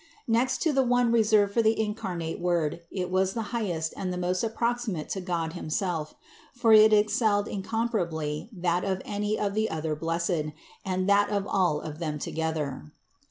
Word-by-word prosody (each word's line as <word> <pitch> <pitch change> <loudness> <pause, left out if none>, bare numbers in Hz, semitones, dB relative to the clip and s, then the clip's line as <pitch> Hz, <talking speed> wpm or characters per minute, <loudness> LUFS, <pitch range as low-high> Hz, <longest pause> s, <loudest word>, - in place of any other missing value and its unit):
Next 245 +3 +1
to 320 -3 +2
the 270 - +4
one 245 -1 +2
reserved 215 -3 +4
for 230 - +3
the 220 0 +2
incarnate 185 -6 -3
Word, 170 -3 0
it 180 -2 -3
was 190 0 +1
the 225 - -1
highest 175 -9 -1
and 185 - -3
the 180 - -3
most 180 +2 -1
proximate 235 -9 -1
to 190 - -3
God 170 -3 -2
himself; 165 -2 -3 0.4
for 235 -3 +4
it 215 0 +8
excelled 210 -1 +3
incomparably 190 -7 -2
that 180 -3 0
of 190 -1 -2
any 210 +1 -1
of 200 -1 -1
the 215 +1 0
other 155 -1 -2
blessed, 165 -1 -1 0.3
and 185 0 -1
that 200 0 +4
of 200 -1 -1
all 180 -7 +1
of 155 0 -7
them 155 -3 -2
together. 150 - -3
190 Hz, 170 wpm, -27 LUFS, 165-215 Hz, 0.4 s, it